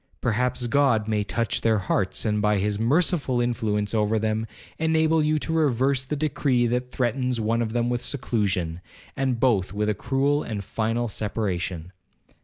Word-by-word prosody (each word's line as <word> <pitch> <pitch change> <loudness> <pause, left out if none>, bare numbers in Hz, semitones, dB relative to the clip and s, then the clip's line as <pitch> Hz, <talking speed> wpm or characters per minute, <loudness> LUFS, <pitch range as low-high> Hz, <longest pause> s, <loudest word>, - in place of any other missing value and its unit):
Perhaps 125 +2 0
God 120 -4 +2
may 105 -1 0
touch 115 +2 -1
their 110 -1 +3
hearts, 95 +1 -1
and 105 -1 +1
by 105 0 +2
his 100 +1 -1
merciful 140 +1 +2
influence 110 -4 0
over 110 0 +1
them, 110 +1 -1 0.3
enable 160 0 +2
you 155 0 +2
to 160 +2 -3
reverse 135 -4 +2
the 150 - -3
decree 140 -4 +1
that 125 +1 -1
threatens 125 0 -1
one 115 +2 0
of 110 -1 -2
them 120 0 +1
with 120 0 -1
seclusion, 100 - -1 0.3
and 130 -3 -1
both 105 -8 +2
with 105 +1 0
a - - +2
cruel 135 +6 0
and 105 -7 -4
final 115 +4 -1
separation.' 95 -5 -3
115 Hz, 165 wpm, -25 LUFS, 105-130 Hz, 0.3 s, their